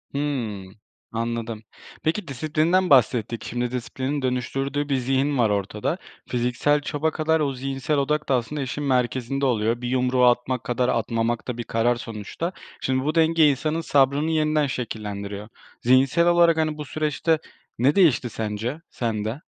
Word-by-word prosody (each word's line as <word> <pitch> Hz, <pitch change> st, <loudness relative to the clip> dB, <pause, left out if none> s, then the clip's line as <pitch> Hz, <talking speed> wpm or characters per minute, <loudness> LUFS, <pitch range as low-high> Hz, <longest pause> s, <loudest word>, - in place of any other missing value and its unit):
Hı. 125 Hz, -9 st, -2 dB, 0.5 s
Anladım. 115 Hz, -1 st, -3 dB, 0.4 s
Peki 165 Hz, +5 st, -1 dB
disiplinden 155 Hz, +7 st, +1 dB
bahsettik. 120 Hz, -4 st, +3 dB
Şimdi 120 Hz, 0 st, -2 dB
disiplinin 130 Hz, +3 st, -3 dB
dönüştürdüğü 135 Hz, +3 st, -2 dB
bir 140 Hz, -, +2 dB
zihin 135 Hz, +2 st, +1 dB
var 115 Hz, -3 st, +3 dB
ortada. 105 Hz, -, -1 dB, 0.3 s
Fiziksel 125 Hz, +4 st, +1 dB
çaba 155 Hz, +2 st, -1 dB
kadar 160 Hz, +1 st, +1 dB
o 140 Hz, -3 st, 0 dB
zihinsel 135 Hz, +3 st, -2 dB
odak 150 Hz, +2 st, 0 dB
da 135 Hz, -, +4 dB
aslında 135 Hz, +4 st, -2 dB
işin 135 Hz, +3 st, -3 dB
merkezinde 130 Hz, 0 st, 0 dB
oluyor, 115 Hz, -1 st, +1 dB
bir 120 Hz, -, -3 dB
yumruğu 125 Hz, 0 st, +2 dB
atmak 125 Hz, 0 st, +2 dB
kadar 125 Hz, +1 st, 0 dB
atmamak 115 Hz, 0 st, -1 dB
da 125 Hz, -2 st, -3 dB
bir 120 Hz, -, -3 dB
karar 115 Hz, +2 st, +1 dB
sonuçta. 115 Hz, -, -5 dB, 0.3 s
Şimdi 130 Hz, 0 st, 0 dB
bu 155 Hz, -, 0 dB
denge 160 Hz, -2 st, +5 dB
insanın 155 Hz, +4 st, -1 dB
sabrını 145 Hz, +2 st, +2 dB
yeniden 155 Hz, -2 st, +2 dB
şekillendiriyor. 105 Hz, -4 st, -5 dB, 0.3 s
Zihinsel 130 Hz, +7 st, +4 dB
olarak 170 Hz, -1 st, +5 dB
hani 155 Hz, -1 st, 0 dB
bu 150 Hz, -, -5 dB
süreçte 155 Hz, +2 st, 0 dB, 0.4 s
ne 135 Hz, +5 st, +3 dB
değişti 150 Hz, -10 st, +4 dB
sence 110 Hz, +8 st, -4 dB
sende? 115 Hz, +2 st, -3 dB
130 Hz, 145 wpm, -24 LUFS, 120-150 Hz, 0.5 s, denge